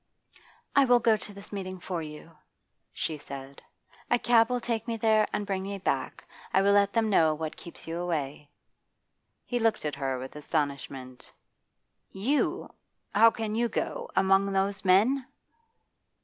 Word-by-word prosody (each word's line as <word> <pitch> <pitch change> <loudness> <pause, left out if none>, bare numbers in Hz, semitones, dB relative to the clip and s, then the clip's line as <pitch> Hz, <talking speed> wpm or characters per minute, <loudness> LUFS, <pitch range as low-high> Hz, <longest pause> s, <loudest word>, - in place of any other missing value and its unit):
'I 280 - +6
will 245 -1 +5
go 225 -1 +4
to 210 0 -6
this 200 0 -11
meeting 185 -2 -5
for 175 -1 -4
you,' 155 +1 -10 0.6
she 155 -2 -3
said. 140 -1 -9 0.5
'A 245 - +4
cab 235 -1 +4
will 250 0 0
take 230 -1 -3
me 230 -1 -2
there 220 -1 +3
and 205 - -2
bring 195 -2 -2
me 200 +1 -4
back. 195 - -2 0.3
I 190 - +3
will 200 - +4
let 200 0 +4
them 225 -1 +2
know 160 -5 +4
what 155 0 -5
keeps 170 - -11
you 165 +1 -4
away.' 150 -4 -3 1.0
He 245 - -1
looked 225 -7 +1
at 150 - -1
her 135 -2 -2
with 130 +3 -8
astonishment. 140 -4 -4 0.8
'You! 245 +10 -1 0.4
How 225 +3 +7
can 220 -1 -4
you 235 +1 +1
go? 485 - -3
Among 195 +1 +4
those 195 0 0
men? 225 +8 +3
195 Hz, 160 wpm, -28 LUFS, 155-225 Hz, 1.0 s, How